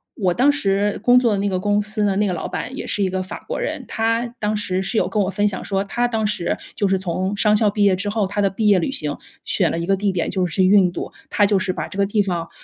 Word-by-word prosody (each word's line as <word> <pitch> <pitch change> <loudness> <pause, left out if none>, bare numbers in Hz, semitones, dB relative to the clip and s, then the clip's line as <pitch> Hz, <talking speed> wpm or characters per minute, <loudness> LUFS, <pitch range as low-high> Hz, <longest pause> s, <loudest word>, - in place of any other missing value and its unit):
我 185 -6 +1
当 265 +7 +4
时 205 -6 0
工 245 +1 +6
作 240 -3 +2
的 - - 0
那 205 - 0
个 185 - -1
公 205 +1 +1
司 210 0 -1
的 195 -1 +1
那 210 -1 +2
个 185 - -1
老 170 - -4
板 260 - -5
也 - - -5
是 205 - -1
一 190 - +1
个 185 0 -2
法 185 - -9
国 - - -3
人， - - -3
他 230 +1 0
当 210 0 -1
时 190 -2 -1
是 220 +4 -2
有 - - +2
跟 210 - 0
我 190 - -1
分 205 +2 +1
享 195 -2 -2
说 195 -1 -1
他 240 +5 -1
当 225 -2 -1
时 205 -5 -1 0.2
就 200 - +1
是 190 - +2
从 185 +2 -2
商 210 0 +3
校 210 -1 +3
毕 205 0 0
业 195 -2 +4
之 200 +3 -2
后， 205 -2 0
他 205 +1 -2
的 195 - +3
毕 210 +3 -1
业 200 -3 +5
旅 175 - -2
行 150 - -3 0.3
选 - - +1
了 - - -2
一 170 - -2
个 195 +2 +2
地 200 0 0
点， 175 -3 -2
就 185 -2 0
是 180 +2 +1
印 190 -2 +5
度。 - - -6 0.2
他 205 - +3
就 200 0 +3
是 185 -1 -1
把 - - -4
这 - - -9
个 200 - +3
地 205 +1 +1
方， 175 -3 -3
200 Hz, 325 characters per minute, -21 LUFS, 185-210 Hz, 0.3 s, 工